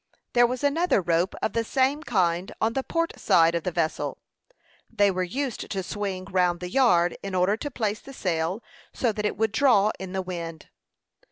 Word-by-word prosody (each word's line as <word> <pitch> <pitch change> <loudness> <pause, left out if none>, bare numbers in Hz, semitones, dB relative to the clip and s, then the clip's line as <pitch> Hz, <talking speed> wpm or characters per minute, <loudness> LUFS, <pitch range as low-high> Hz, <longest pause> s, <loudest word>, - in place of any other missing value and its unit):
There 240 0 +5
was 250 +2 -4
another 320 - +2
rope 175 +1 0
of - - 0
the 230 - +1
same 265 +5 +1
kind 185 - 0
on 225 +1 +1
the 270 - 0
port 330 +4 -2
side 165 0 +4
of 170 - 0
the 180 - -2
vessel. 165 -2 -1 0.7
They 205 -3 +3
were 185 0 -2
used 250 +7 -3
to 195 -2 -2
swing 190 -1 -4
round 180 -2 +1
the 180 0 -6
yard, 180 -10 +3
in 195 -1 -5
order 185 +3 +3
to 290 - -4
place 220 -5 -2
the 275 - -12
sail 180 -2 -2 0.3
so 240 - 0
that 210 0 -1
it - - -4
would 220 -1 +1
draw 220 -4 +4
in 190 -1 -6
the 190 0 -2
wind. 170 -3 -6
200 Hz, 195 wpm, -26 LUFS, 180-240 Hz, 0.7 s, There